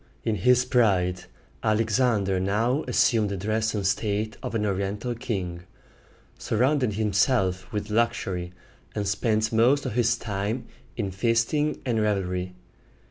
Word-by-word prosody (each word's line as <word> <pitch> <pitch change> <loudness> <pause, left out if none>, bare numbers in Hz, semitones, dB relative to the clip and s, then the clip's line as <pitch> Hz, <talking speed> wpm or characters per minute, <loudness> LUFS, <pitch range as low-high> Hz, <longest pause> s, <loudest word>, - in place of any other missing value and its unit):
In 110 - 0
his 125 +2 +4
pride, 95 -8 +2 0.4
Alexander 110 -3 +1
now 115 +9 +1
assumed 115 -3 +3
the 100 - -3
dress 110 +3 -1
and 100 -2 -2
state 105 +2 0
of - - -5
an 105 -1 0
Oriental 100 +4 -2
king, 95 -8 -4 0.8
surrounded 125 0 +1
himself 100 -2 +1
with 105 -1 -4
luxury, 95 -6 0 0.4
and 105 -2 -1
spent 110 +2 0
most 125 +6 +3
of - - -2
his 120 0 +2
time 105 +2 -3 0.3
in 100 -5 -2
feasting 115 +9 0
and 115 -4 +1
revelry. 90 -3 -1
110 Hz, 130 wpm, -26 LUFS, 100-120 Hz, 0.8 s, his